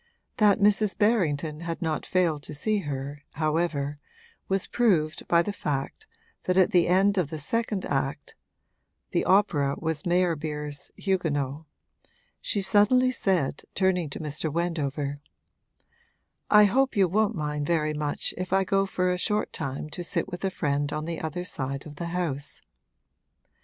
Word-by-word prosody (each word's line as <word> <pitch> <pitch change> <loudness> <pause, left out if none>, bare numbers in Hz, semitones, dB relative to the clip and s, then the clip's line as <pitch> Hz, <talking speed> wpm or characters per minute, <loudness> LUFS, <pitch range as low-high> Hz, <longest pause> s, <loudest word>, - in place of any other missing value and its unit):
That 210 -3 +5
Mrs. 205 -2 +3
Berrington 160 -9 +1
had 170 0 -4
not 160 -4 -2
failed 170 -5 +1
to 150 - -5
see 215 +8 +1
her, 145 -2 -5
however, 155 -2 -1 0.5
was 195 0 0
proved 175 -11 +1
by 170 0 +4
the 205 - -3
fact 140 -7 -4 0.4
that 185 0 +1
at 190 +2 +5
the 175 -4 +4
end 195 +2 +3
of 165 -6 0
the 155 - -5
second 210 +5 -1
act 135 +1 -2 0.8
(the - - +1
opera 150 -8 +3
was 160 -2 -2
Meyerbeer's 155 -5 -1
Huguenots) 155 -6 -1 0.8
she 200 - -1
suddenly 235 +6 +4
said, 180 - 0
turning 185 -4 +1
to - - -6
Mr. 155 0 -3
Wendover: 145 -4 -2 1.3
'I 210 0 +8
hope 260 +3 +2
you 195 -2 +5
won't 215 +4 +1
mind 150 -2 -2
very 155 -3 +1
much 150 -1 -1
if 185 0 -4
I 195 0 +3
go 195 +1 +1
for 180 -1 0
a 180 - -3
short 210 +3 0
time 135 +2 -4
to 175 - -5
sit - - -1
with 175 -1 -7
a 195 - +2
friend 145 -4 -1
on 155 0 -3
the 165 -1 -4
other 160 +3 -3
side 140 -5 -4
of 150 -2 -10
the 170 - -4
house.' 170 -5 -4
170 Hz, 155 wpm, -27 LUFS, 150-195 Hz, 1.3 s, I